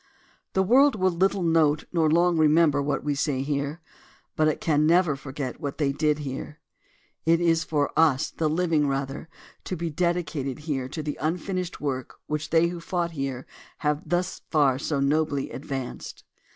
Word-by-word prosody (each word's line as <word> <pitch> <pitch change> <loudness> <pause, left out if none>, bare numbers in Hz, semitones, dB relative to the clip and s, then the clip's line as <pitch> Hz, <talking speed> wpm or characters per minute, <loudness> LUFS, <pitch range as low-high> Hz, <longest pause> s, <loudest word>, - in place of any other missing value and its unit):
The 190 - +3
world 265 +7 +5
will 185 -2 +2
little 190 +2 +1
note 160 -3 +3
nor 160 -3 +3
long 170 +2 +3
remember 155 -2 +4
what 145 +1 -1
we 145 - 0
say 140 -2 -1
here, 145 +3 -2 0.5
but 155 - +3
it 155 - 0
can 150 -1 +2
never 170 -3 +4
forget 135 -1 -6
what 140 -2 -4
they 145 -3 +1
did 150 +1 +1
here. 145 +1 -6 0.6
It 165 +1 +3
is 165 -1 +2
for 150 -3 0
us, 155 -3 +3
the 155 -2 -1
living, 160 -2 +1
rather, 135 +3 -3 0.4
to 185 - -3
be 165 0 -3
dedicated 165 -5 -1
here 135 -5 -2
to 155 +3 -5
the 150 -1 -4
unfinished 180 +3 -2
work 130 -3 -3
which 150 0 -3
they 165 +1 +3
who 175 0 -6
fought 170 0 -2
here 135 -4 -4 0.4
have 150 +1 +1
thus 175 +3 -2
far 140 -5 +3
so 140 0 -1
nobly 145 0 0
advanced. 135 -1 -6
155 Hz, 170 wpm, -26 LUFS, 140-170 Hz, 0.6 s, world